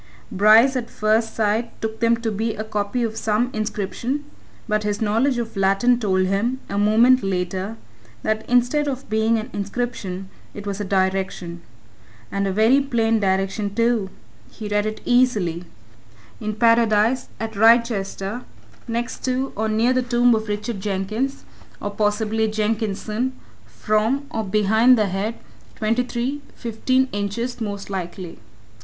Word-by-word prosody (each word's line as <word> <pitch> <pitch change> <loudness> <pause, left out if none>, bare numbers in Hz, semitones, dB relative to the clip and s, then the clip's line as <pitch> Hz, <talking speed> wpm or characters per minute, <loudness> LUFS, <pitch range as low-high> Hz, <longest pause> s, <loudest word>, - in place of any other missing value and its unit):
Bryce 220 +6 +6
at 240 -2 -2
first 220 +1 +1
sight 220 +2 -1
took 220 0 -4
them 230 0 +3
to 225 -1 -1
be 220 +2 -2
a 215 - -4
copy 215 +3 -2
of 225 -1 -3
some 225 +3 0
inscription 215 +6 -3 0.4
but 215 -1 +1
his 210 0 -2
knowledge 230 +5 +1
of 230 -2 -4
Latin 195 +5 +3
told 190 -4 +1
him, 215 +7 0
a 200 - -1
moment 230 +5 +5
later, 190 +3 -2 0.5
that 215 0 0
instead 250 +5 +2
of 270 -1 -4
being 220 +1 +2
an 220 +3 -5
inscription, 200 -3 -4 0.3
it 205 - -7
was 200 0 -3
a - - -1
direction. 190 -3 -1 0.7
And 200 0 0
a - - 0
very 225 +8 +4
plain 230 -4 +1
direction, 195 +1 -1
too! 230 -4 +1 0.4
he 215 - -7
read 205 0 0
it 215 0 -5
easily. 210 -9 +2 0.7
In 215 0 -3
Paradise, 230 +1 +3
at 220 0 -4
Wrychester, 220 -1 +2 0.5
next 235 +1 -3
to, 260 +1 -1
or 220 +1 -1
near, 225 +4 +2
the 255 - +2
tomb 245 0 +3
of 220 0 -1
Richard 210 +1 -3
Jenkins, 210 +7 -2 0.4
or, 205 - -4
possibly, 215 +1 0
Jenkinson, 215 +2 -1 0.3
from, 220 +6 0
or 220 - -2
behind, 220 +5 +4
the 215 - +2
head, 200 +5 -2 0.4
twenty 225 +3 +1
three, 250 +4 -3
fifteen 255 +3 0
inches, 215 +5 -3
most 200 -2 -4
likely. 180 -2 -5
220 Hz, 145 wpm, -22 LUFS, 205-240 Hz, 0.7 s, Bryce